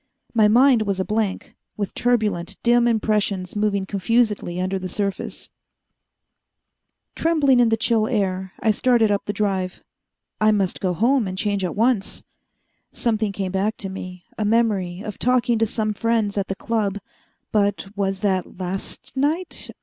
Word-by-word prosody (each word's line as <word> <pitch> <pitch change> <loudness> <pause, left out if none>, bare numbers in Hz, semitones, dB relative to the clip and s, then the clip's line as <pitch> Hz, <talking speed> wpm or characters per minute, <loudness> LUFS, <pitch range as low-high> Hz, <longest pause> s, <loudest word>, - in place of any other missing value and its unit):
My 220 -3 +5
mind 245 +2 +5
was 200 -3 -1
a 190 - 0
blank, 215 -2 -2 0.2
with 205 -2 -3
turbulent, 210 -6 0
dim 240 0 +4
impressions 210 -5 0
moving 205 -2 0
confusedly 205 -2 0
under 190 +1 -1
the 185 0 -5
surface. 200 0 -4 1.6
Trembling 295 -6 +3
in 240 -2 +5
the 225 - +2
chill 220 -1 +2
air, 190 -5 -1
I 220 - +3
started 230 0 +3
up 200 - 0
the - - -1
Drive. 195 -3 -2 0.6
I 215 - +4
must 195 -3 0
go 185 -2 0
home 240 +2 +2
and 185 0 -5
change 200 -1 0
at 180 - -2
once. 225 -2 +1 0.7
Something 220 -3 0
came 195 -2 -3
back 200 +3 0
to 195 - -4
me 185 -1 -8
a - - +1
memory 205 -5 +1
of 210 -2 -7
talking 245 -2 +2
to 225 - +2
some 215 0 -1
friends 220 -1 0
at 200 -1 -1
the 195 - -3
Club. 210 -2 -1 0.5
But 200 -2 +1
was 195 -1 -1
that 190 -4 -1
last 185 +6 -5
night? 310 +7 -1
210 Hz, 155 wpm, -22 LUFS, 195-230 Hz, 1.6 s, My